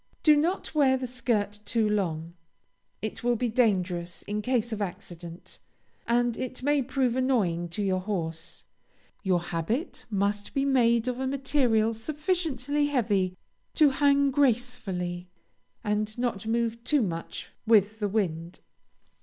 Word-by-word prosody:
Do 305 -2 +7
not 330 +6 0
wear 275 -4 +4
the 260 - -4
skirt 230 -5 -1
too 220 0 +1
long; 170 -6 -1 0.7
it 220 - -4
will 240 0 +2
be 240 +1 0
dangerous 185 -7 0
in 210 +1 -3
case 240 0 0
of 210 - -4
accident, 175 -2 -7 0.5
and 240 0 +2
it 255 +1 -5
may 290 0 +3
prove 260 -1 0
annoying 205 -10 +1
to 185 +5 -3
your 190 -1 +1
horse. 170 -4 -4 0.6
Your 185 -3 +2
habit 175 - -3
must 205 0 -1
be 275 0 +2
made 235 -3 +3
of 250 0 -2
a 265 - -1
material 260 -5 +2
sufficiently 295 - -1
heavy 205 -9 +1 0.4
to 300 -3 +6
hang 280 0 +3
gracefully, 215 -10 0 0.6
and 210 +1 -1
not 235 -4 -2
move 230 0 0
too 285 0 +3
much 165 -4 -5 0.2
with 215 -1 +4
the 205 - 0
wind. 175 -5 -2
225 Hz, 135 wpm, -27 LUFS, 195-260 Hz, 0.7 s, Do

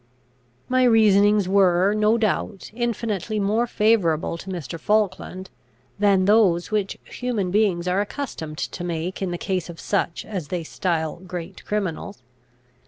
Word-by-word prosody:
My 255 0 +2
reasonings 210 -4 +5
were, 190 0 +4
no 215 +2 +3
doubt, 210 -2 -2
infinitely 225 -3 -2
more 215 +4 +1
favourable 205 -9 +2
to 195 - -9
Mr. 165 -4 -5
Falkland, 195 -1 -1 0.5
than 200 -2 +4
those 195 -5 +3
which 205 -2 -1
human 225 -7 -3
beings 190 -4 +1
are 185 +2 +2
accustomed 200 - -5
to 175 - -4
make 175 +2 -3
in 190 - -1
the 175 - -3
case 185 -1 -2
of 170 - -9
such 190 -4 -1
as 185 -8 -5
they 175 +1 -3
style 160 -1 -2
great 180 0 -8
criminals. 200 -4 -3
195 Hz, 140 wpm, -23 LUFS, 175-215 Hz, 0.5 s, reasonings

